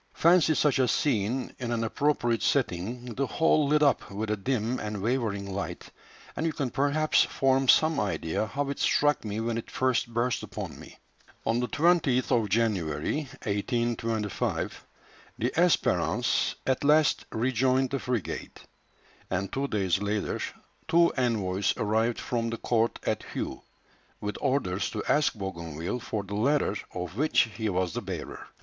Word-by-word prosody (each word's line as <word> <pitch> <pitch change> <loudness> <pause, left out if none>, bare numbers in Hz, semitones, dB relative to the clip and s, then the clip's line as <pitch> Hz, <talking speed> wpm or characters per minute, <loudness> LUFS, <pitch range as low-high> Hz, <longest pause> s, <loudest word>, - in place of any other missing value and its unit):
Fancy 170 -2 +4
such 145 -2 +2
a 130 - +4
scene 125 -1 0
in 120 -2 -3
an 115 -1 0
appropriate 120 -1 +1
setting, 120 0 -1
the 135 +4 -1
whole 155 -1 +3
lit 150 +1 +3
up 140 -5 +2
with 105 +2 -3
a - - +2
dim 120 +2 -1
and 105 -1 -4
wavering 100 -3 -1
light, 100 - -5 0.4
and - - -2
you 165 - +1
can 135 -5 -3
perhaps 145 +3 +3
form 135 0 +1
some 155 +4 +5
idea 100 0 -1
how 140 +5 -2
it 140 - -6
struck 145 0 +2
me 105 0 -3
when 115 0 -1
it - - -9
first 130 -2 0
burst 120 +2 0
upon - - -7
me." - - -13 0.5
On 115 +1 +1
the 125 - 0
20th 150 -6 +2
of 115 -4 +2
January, 105 - 0 0.2
1825, 115 0 -2 0.5
the - - 0
Espérance - - +2
at 130 +1 0
last 150 +1 +4
rejoined 130 +2 +1
the 135 - -1
frigate; 125 -6 -4 0.7
and, 95 +1 -2
two 140 +1 -1
days 95 -7 0
later, 105 0 -1 0.5
two 170 0 +4
envoys 105 -7 0
arrived 110 +3 +1
from 115 -1 -2
the 115 - -3
court 115 0 +1
at - - 0 0.2
Hué, - - -4 0.6
with 105 0 -4
orders 105 -9 0
to 105 - -4
ask 150 -4 +2
Bougainville 85 0 -4
for 110 -4 -3
the 100 +1 -8
letter 125 +1 +1 0.2
of 90 +2 -6
which 155 +3 +4
he 110 -1 -1
was 90 -3 -1
the - - -3
bearer. - - -6
120 Hz, 155 wpm, -28 LUFS, 105-135 Hz, 0.7 s, some